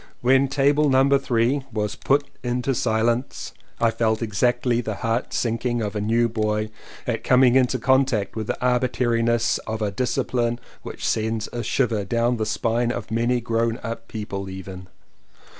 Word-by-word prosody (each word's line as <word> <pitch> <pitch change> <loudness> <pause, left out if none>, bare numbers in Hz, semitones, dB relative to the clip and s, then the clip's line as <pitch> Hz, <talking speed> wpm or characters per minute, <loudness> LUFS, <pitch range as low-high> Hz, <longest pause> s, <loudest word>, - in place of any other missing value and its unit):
When 130 +2 +4
table 145 +2 +2
No. 135 +1 +4
3 130 +1 +1
was 105 -2 -2
"put 140 +1 +1
into 125 +2 -1
silence" 115 +2 -1 0.3
I 115 -1 +3
felt 110 0 0
exactly 120 +3 +1
the 110 -3 -4
heart 115 +4 -2
sinking 120 0 -1
of 105 0 -4
a 105 - -1
new 115 +3 +2
boy 110 -1 -1 0.4
at - - -2
coming 125 -1 +5
into 130 0 +3
contact 130 -5 +1
with 110 -1 -4
the - - -2
arbitrariness 120 -2 +1
of 110 0 -3
a 105 -2 -1
discipline 120 +1 -1 0.2
which - - -5
sends 110 0 -1
a 120 - -2
shiver 115 -4 0
down 120 +4 0
the 110 -1 -2
spine 115 +2 0
of 115 -2 -5
many 120 +2 +1
grown 115 0 0
up 115 0 -5
people 100 -3 -5
even. 95 -1 -8
115 Hz, 160 wpm, -23 LUFS, 110-125 Hz, 0.4 s, coming